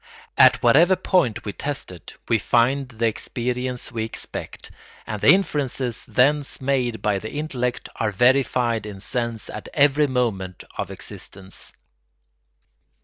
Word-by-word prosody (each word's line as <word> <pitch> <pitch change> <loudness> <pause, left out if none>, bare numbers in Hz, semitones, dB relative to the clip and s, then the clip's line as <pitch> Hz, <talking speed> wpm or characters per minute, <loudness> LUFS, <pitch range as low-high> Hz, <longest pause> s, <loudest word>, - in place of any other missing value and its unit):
At 130 -1 +6
whatever 160 +10 +6
point 165 - +1
we 105 - -4
test 140 -5 -4
it, 90 -3 -12
we 115 - +2
find 130 +5 +2
the 115 -2 -2
experience 125 +2 -3
we 115 -2 -2
expect, 110 - -7 0.3
and 105 -2 -5
the - - +5
inferences 140 - +1
thence 145 +3 +2
made 130 -4 -1
by 105 -2 +1
the 110 - -7
intellect 130 -5 -3
are 105 - 0
verified 120 -1 +2
in 100 -2 -8
sense 115 +1 -3
at 105 - -8
every 145 0 +4
moment 110 -8 -2
of - - -4
existence. 95 0 -8
125 Hz, 135 wpm, -23 LUFS, 110-135 Hz, 0.3 s, At